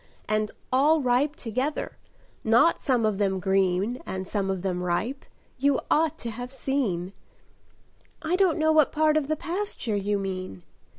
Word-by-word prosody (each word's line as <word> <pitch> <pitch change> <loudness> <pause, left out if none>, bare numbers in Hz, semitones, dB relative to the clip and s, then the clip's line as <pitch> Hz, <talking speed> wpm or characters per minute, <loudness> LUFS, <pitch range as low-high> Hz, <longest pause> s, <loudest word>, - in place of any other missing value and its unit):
And 215 0 0 0.2
all 295 +3 +4
ripe 255 +4 +2
together, 255 +6 -3 0.4
not 235 +9 +4
some 245 -4 +2
of 210 -2 0
them 190 -2 +1
green 190 +5 +1
And 190 0 -5
some 195 -2 -1
of 190 -2 -2
them 180 -2 -1
ripe! 195 +10 -2 0.3
You 280 0 +3
ought 315 -1 +2
to 230 - -4
have 245 +3 -7
seen!" 235 -10 -2 1.1
"I 330 +3 +1
don't 370 -3 +3
know 315 0 +3
what 310 -2 +4
part 310 0 +3
of 305 -3 +1
the 310 - 0
pasture 340 - -3
you 205 +1 0
mean." 185 - -5
235 Hz, 160 wpm, -26 LUFS, 195-295 Hz, 1.1 s, all